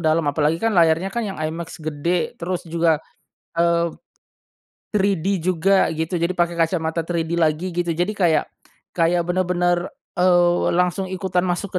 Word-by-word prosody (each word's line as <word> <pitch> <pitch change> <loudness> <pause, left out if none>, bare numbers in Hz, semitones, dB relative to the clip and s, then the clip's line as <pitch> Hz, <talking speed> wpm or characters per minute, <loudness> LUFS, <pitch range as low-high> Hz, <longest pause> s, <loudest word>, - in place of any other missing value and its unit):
dalam 160 0 +2
apalagi 150 +2 +1
kan 225 +3 0
layarnya 165 +2 +3
kan 235 - -1
yang 195 - -6
iMAX 160 +2 -4
gede 155 +3 -1
terus 180 +1 -3
juga, 165 -1 +1 0.6
eee, 170 0 +2 1.0
3D 195 -4 +1 0.2
juga 185 +2 +3
gitu 160 +3 -3
jadi 170 +2 +1
pakai 175 0 +1
kacamata 165 0 0
3D 165 0 -2
lagi 165 +2 +1
gitu 175 -1 -1
jadi 175 +6 -1
kayak, 175 -6 +2 0.5
kayak 170 0 +2
bener-bener, 175 -1 0 0.3
eee, 175 -1 +3
langsung 180 +2 0
ikutan 185 -1 -1
masuk 180 +1 -2
175 Hz, 145 wpm, -21 LUFS, 165-180 Hz, 1.0 s, layarnya